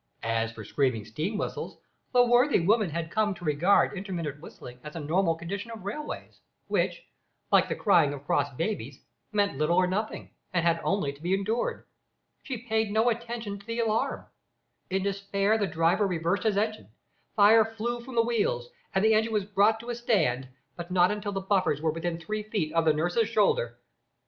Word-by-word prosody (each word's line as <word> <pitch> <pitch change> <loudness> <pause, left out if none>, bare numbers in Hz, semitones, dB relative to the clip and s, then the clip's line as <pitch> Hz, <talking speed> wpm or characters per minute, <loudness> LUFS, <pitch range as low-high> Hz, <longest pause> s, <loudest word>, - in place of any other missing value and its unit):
As 115 0 0
for 110 -1 -9
screaming 125 -3 0
steam 155 - -3
whistles, - - -4 0.3
the 245 -1 +5
worthy 245 +3 +4
woman 205 +3 +2
had 160 +1 -4
come 210 -2 +1
to 175 - -10
regard 165 +8 +3
intermittent 170 -7 -5
whistling 125 -6 -11
as 150 +1 -9
a - - -4
normal 165 +3 +1
condition 195 +7 -5
of 225 -4 -8
railways, 300 +10 -6 0.2
which, - - -1 0.5
like - - +4
the - - -1
crying 170 -9 +4
of 145 -1 -8
cross 145 0 +1
babies, 145 - -4 0.3
meant 205 -9 0
little 155 +3 +2
or 185 - +5
nothing, 205 +4 -3 0.2
and 175 -2 +1
had 170 -1 +2
only 185 -8 0
to 140 - -17
be 180 +3 +1
endured. 215 +5 -2 0.6
She 250 -4 -6
paid 220 -1 +1
no 220 +3 +3
attention 230 -3 -5
to 200 - -17
the 230 0 -3
alarm. 225 -1 0 0.6
In 190 0 0
despair 200 +2 0
the 200 - +1
driver 170 +5 +2
reversed 180 +3 -1
his 210 -2 +2
engine; 215 +1 -1 0.5
fire 220 +1 +7
flew 225 +2 -4
from 255 0 -9
the 230 - +4
wheels, 200 - -1 0.2
and 190 +2 +3
the 220 - +5
engine 220 +1 +2
was 210 -3 +1
brought 210 +2 +3
to 240 +1 -5
a - - -3
stand, 160 - +1 0.3
but 175 +2 -7
not 180 0 +4
until 210 0 -3
the 195 -1 -3
buffers 190 -6 +1
were 160 0 +1
within 165 +1 -3
three 215 +6 -3
feet 205 -7 -2
of 165 -1 +2
the 155 - +6
nurse's 175 +9 +1
shoulder. 445 - +1
195 Hz, 190 wpm, -28 LUFS, 165-220 Hz, 0.6 s, fire